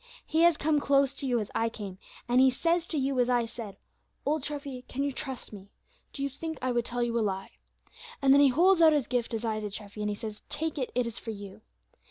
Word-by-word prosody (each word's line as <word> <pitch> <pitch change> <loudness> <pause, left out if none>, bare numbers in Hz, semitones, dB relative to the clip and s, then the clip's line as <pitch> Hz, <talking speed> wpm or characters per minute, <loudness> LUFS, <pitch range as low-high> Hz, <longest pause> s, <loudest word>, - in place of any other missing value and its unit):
He 320 +1 +1
has 340 -2 +6
come 300 0 +2
close 275 -1 +3
to 275 - -4
you, 245 -2 +2
as 210 - -5
I 230 0 +1
came, 200 -4 -8 0.3
and 245 +1 +4
He 265 - +7
says 335 +6 +1
to 315 - -2
you, 270 -1 0
as 245 0 +3
I 240 -1 +3
said: 225 -3 -8 0.5
'Old 305 +1 +1
Treffy, 280 -2 -5
can 275 +2 -2
you 285 - 0
trust 265 -4 -6
Me? 200 -1 -11 0.4
do 275 - -4
you 280 - 0
think 320 +3 -5
I 255 0 -1
would 240 -1 0
tell 245 0 -1
you 235 0 0
a - - +1
lie?' 195 -2 -3 0.6
And 275 -2 +5
then 285 - +7
He 280 - +7
holds 350 +6 +4
out 320 -1 +7
His 290 -4 +2
gift, 245 -1 -1
as 225 0 -3
I 220 -1 -1
did, 210 -2 -5
Treffy, 210 0 -7
and 210 - 0
He 205 - -2
says, 215 -1 -7
'Take 310 +1 -2
it; 255 - -2
it 250 -1 +2
is 235 0 -5
for - - -8
you.' 200 -3 -8
255 Hz, 260 wpm, -29 LUFS, 225-285 Hz, 0.6 s, He